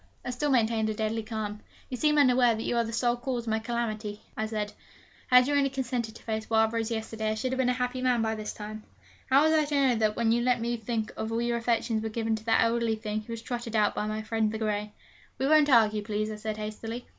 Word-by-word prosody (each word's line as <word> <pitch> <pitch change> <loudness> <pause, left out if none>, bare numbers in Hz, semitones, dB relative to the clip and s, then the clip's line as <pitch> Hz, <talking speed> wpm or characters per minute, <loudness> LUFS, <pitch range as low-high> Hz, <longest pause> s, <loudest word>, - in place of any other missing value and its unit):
I - - -2
still 290 +4 -1
maintained 225 -4 +2
a 215 - -2
deadly 220 +1 -1
calm. 215 -2 -4 0.3
'You 255 - -4
seem 300 +4 +2
unaware 250 -4 +5
that 220 - -4
you - - -1
are 235 - +3
the 225 - -5
sole 240 +1 +1
cause 245 -1 -3
of 225 - -3
my 220 - +1
calamity,' 220 -2 -3 0.2
I 220 - -2
said. 210 -1 -3 0.5
'Had 250 0 +6
you 290 - 0
only 280 -1 +3
consented 250 -4 -3
to - - -13
face 220 -1 -3
Wild 220 0 +3
Rose 230 0 -1
yesterday, 220 -1 -3
I 215 - 0
should 255 +4 -2
have 260 - -2
been 255 -1 +3
a - - +3
happy 250 0 -2
man 250 -3 +2
by 220 0 0
this 215 -1 -4
time!' 215 +1 -7 0.5
'How 270 +2 +6
was 315 0 +4
I 310 -1 +3
to 290 0 -2
know 270 -3 +3
that, 215 -1 +1
when 230 -1 +2
you 235 +1 +2
let 245 0 +2
me 235 +1 -1
think 225 -1 -3
all 225 +1 -2
your 235 0 0
affections 230 -1 0
were 220 - -3
given 225 0 -1
to 215 - -11
the 225 - +3
elderly 230 -1 +2
thing 215 0 -3
who 230 +2 -8
is 230 0 -7
trotted 235 -2 -4
out 210 -1 +3
by 210 - -2
my 215 0 -3
friend 220 -1 0
the 220 - -3
grey?' 210 -1 -2 0.5
'We 265 - -1
won't 300 0 +5
argue, 215 -4 +4
please,' 215 0 -2
I 215 - -6
said 215 0 -4
hastily. 225 +3 -5
225 Hz, 260 wpm, -28 LUFS, 215-245 Hz, 0.5 s, Had